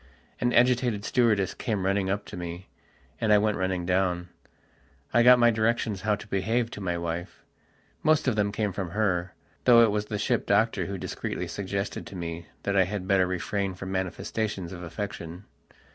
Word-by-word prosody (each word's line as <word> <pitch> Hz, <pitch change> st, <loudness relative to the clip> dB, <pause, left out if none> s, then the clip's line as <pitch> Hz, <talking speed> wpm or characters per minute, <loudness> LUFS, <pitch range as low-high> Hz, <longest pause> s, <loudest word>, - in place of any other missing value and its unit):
An 120 Hz, -, +1 dB
agitated 125 Hz, -4 st, +3 dB
stewardess 110 Hz, -6 st, +2 dB
came 105 Hz, -5 st, -2 dB
running 95 Hz, 0 st, +1 dB
up 100 Hz, +1 st, -1 dB
to -, -, -9 dB
me, 85 Hz, +1 st, -7 dB, 0.5 s
and 110 Hz, -, +1 dB
I 105 Hz, -, +7 dB
went 105 Hz, 0 st, +1 dB
running 95 Hz, -1 st, -1 dB
down. 90 Hz, -1 st, 0 dB, 0.8 s
I 120 Hz, -, +5 dB
got 125 Hz, +1 st, +8 dB
my 120 Hz, -1 st, +5 dB
directions 110 Hz, -2 st, 0 dB
how 105 Hz, -1 st, +2 dB
to 105 Hz, -, -11 dB
behave 115 Hz, +5 st, 0 dB
to 105 Hz, -, -7 dB
my 90 Hz, -2 st, -1 dB
wife. 85 Hz, +1 st, -5 dB, 0.6 s
Most 155 Hz, -2 st, +3 dB
of 125 Hz, -, +2 dB
them 105 Hz, -1 st, +1 dB
came 105 Hz, -2 st, -1 dB
from 95 Hz, -2 st, -3 dB
her, 90 Hz, -4 st, 0 dB, 0.3 s
though 120 Hz, -2 st, +8 dB
it 110 Hz, -, +4 dB
was 105 Hz, 0 st, -1 dB
the 105 Hz, -, -3 dB
ship 105 Hz, -, 0 dB
doctor -, -, +2 dB
who -, -, -4 dB
discreetly -, -, -4 dB
suggested 100 Hz, 0 st, -4 dB
to -, -, -10 dB
me 85 Hz, -1 st, -5 dB, 0.2 s
that 100 Hz, -, -1 dB
I 95 Hz, -1 st, +5 dB
had 95 Hz, 0 st, -4 dB
better 95 Hz, -1 st, +3 dB
refrain 95 Hz, +2 st, -2 dB
from 95 Hz, +1 st, -6 dB
manifestations 95 Hz, 0 st, -3 dB
of 90 Hz, -, -8 dB
affection. 90 Hz, 0 st, -6 dB
100 Hz, 185 wpm, -27 LUFS, 90-110 Hz, 0.8 s, got